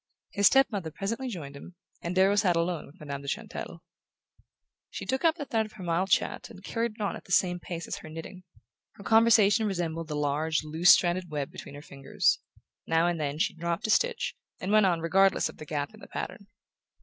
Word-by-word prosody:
His 200 -1 +4
step 270 0 +6
mother 190 -6 -3
presently 220 - -4
joined 155 - -6
him, 175 +5 -11 0.3
and 170 +2 -4
Darrow 190 +2 +4
sat 195 -4 +3
alone 170 -1 -1
with 140 - -18
Madame 140 -2 -6
de 140 - -10
Chantelle. - - -5 1.1
She - - -6
took 265 0 -1
up 330 -1 +4
the 300 -4 -6
thread 220 -4 0
of 215 - -19
her 195 - -10
mild 175 +3 0
chat - - 0
and - - -13
carried 230 -1 -2
it 220 - -10
on 200 - -1
at - - -11
the - - -13
same 180 0 +3
pace 170 -1 -6
as - - -4
her 155 - -10
knitting. 165 +4 -8 0.5
Her 200 - -13
conversation 220 -1 +5
resembled 165 -4 -3
the 150 - -4
large 150 +2 0
loose 160 +3 +2
stranded 175 0 +5
web 145 -3 -3
between - - -10
her 145 - -10
fingers: 135 -2 0 0.5
now 165 +1 +3
and 175 -1 0
then 145 -1 -2
she 160 - +1
dropped 170 +5 -3
a 220 - +1
stitch, 475 - +1 0.2
and 185 - -3
went 215 -2 +5
on 170 -3 +1
regardless 190 +3 +3
of - - -12
the 155 - -9
gap 145 +5 -3
in 215 - -15
the - - -12
pattern. 200 - -6
175 Hz, 220 wpm, -28 LUFS, 160-205 Hz, 1.1 s, step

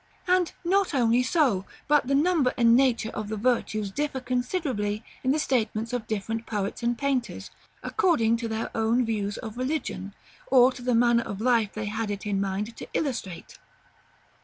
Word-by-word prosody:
And 360 -1 +3
not 380 -2 +1
only 240 -1 +3
so, 250 - +2 0.2
but 295 -3 +3
the 275 - +2
number 300 -3 +2
and 235 -1 +5
nature 245 -4 +2
of 210 - -5
the 215 - -3
virtues 215 -3 0
differ 290 +3 -2
considerably 250 - -2 0.2
in 260 - 0
the 285 - +3
statements 230 -5 -1
of 240 -3 -3
different 225 +2 -3
poets 205 0 -3
and 235 0 0
painters, 245 -9 -2 0.3
according 310 - +2
to 230 0 -4
their 220 0 -3
own 225 +2 +2
views 205 -3 -2
of 225 -1 -7
religion, 255 -7 -3 0.3
or 255 -1 +6
to 255 - -10
the 245 -1 +1
manner 235 0 +4
of 200 -3 -6
life 230 -3 +2
they 215 0 -4
had 215 +1 -3
it 205 0 -4
in 200 -1 0
mind 200 +4 -3
to - - -8
illustrate. 230 - -4
235 Hz, 175 wpm, -26 LUFS, 215-265 Hz, 0.3 s, or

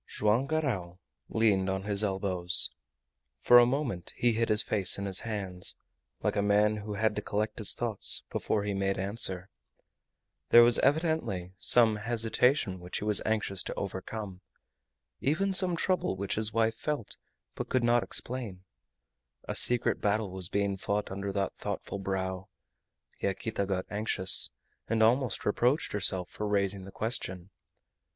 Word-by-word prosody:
Joam 110 +6 0
Garral 115 - -3 0.3
leaned 100 -4 +1
on 95 0 -3
his 100 0 +2
elbows. 95 -3 +1 0.7
For 120 - +7
a 120 - +5
moment 120 - -3
he 120 - +2
hid 115 +1 -1
his 105 0 +5
face 100 -4 +3
in 100 - -4
his 95 -2 +3
hands, 95 -5 +2 0.5
like - - 0
a 100 - +1
man 105 +1 +2
who 105 0 -6
had 110 +1 0
to - - -1
collect 105 +1 -3
his 105 - +4
thoughts 115 -4 +1
before 105 - -2
he 105 0 -3
made 95 0 -1
answer. 95 -1 0 1.0
There 120 - +8
was 120 0 +4
evidently 140 - -1
some 110 +1 +4
hesitation 115 -1 +1
which 90 +1 -6
he - - -6
was 105 -1 +4
anxious 105 -4 -1
to - - -6
overcome, 95 0 -6 0.8
even 190 +8 0
some 185 -2 +4
trouble 185 - -1
which 100 +1 -3
his 110 0 +1
wife 115 +1 +1
felt 145 -2 -4 0.4
but - - -6
could 130 -2 0
not 120 0 +3
explain. 115 -9 -6 0.8
A - - -3
secret 120 0 +4
battle 105 -1 -1
was 95 -2 -4
being 100 -1 -1
fought 100 +1 -3
under 100 +1 -4
that 100 0 -2
thoughtful 100 - -5
brow. 95 0 -4 0.7
Yaquita 100 +1 -3
got 95 -1 -2
anxious, 100 -3 +3 0.4
and 110 0 +1
almost 120 +1 +1
reproached 125 +9 0
herself 95 -3 0
for 105 - -6
raising 100 -2 -1
the 95 - -11
question. 95 -5 -3
105 Hz, 155 wpm, -29 LUFS, 95-115 Hz, 1.0 s, There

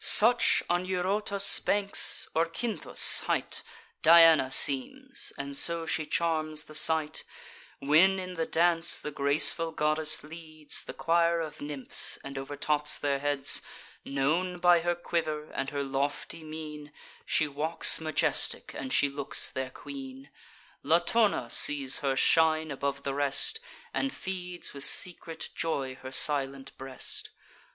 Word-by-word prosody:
Such 235 +3 +4
on 175 +1 -1
Eurotas' 195 +2 +2
banks, 200 -1 +1
or 165 +1 +1
Cynthus' 220 +7 +3
height, - - -2 0.4
Diana 165 -4 +6
seems; 260 - +1
and 140 0 -6
so 170 +2 +3
she 155 -1 -2
charms 155 -2 -1
the 155 - -15
sight, 155 0 +1 0.5
When 165 +7 +3
in 185 -1 -6
the 165 -2 -3
dance 170 0 +2
the 150 - -6
graceful 145 +4 +1
goddess 155 0 +1
leads 155 -1 -6
The - - -9
choir 170 0 +1
of 160 -2 -7
nymphs, 145 -2 -1
and 135 0 -9
overtops 145 +2 -1
their 140 -1 -2
heads: 145 -1 +1 0.4
Known 160 +7 -1
by 175 0 +4
her 175 +1 -1
quiver, 155 -3 -4
and 135 0 -4
her 140 -1 -3
lofty 140 +4 -4
mien, 155 -1 -9 0.3
She 155 - 0
walks 155 +3 +1
majestic, 155 -1 -1
and 130 -1 -6
she 145 - +3
looks 140 0 -1
their 130 -1 -4
queen; 270 - -11 0.5
Latona 215 - +1
sees 140 -3 +3
her 135 -2 -2
shine 160 +1 +2
above 140 0 -4
the 140 - -3
rest, 145 - -1 0.3
And 275 - -1
feeds 180 -4 -6
with 140 -1 -3
secret 165 +1 -1
joy 140 -5 -3
her 130 - -9
silent 135 -1 0
breast. 135 -1 -7
155 Hz, 135 wpm, -28 LUFS, 140-170 Hz, 0.5 s, Diana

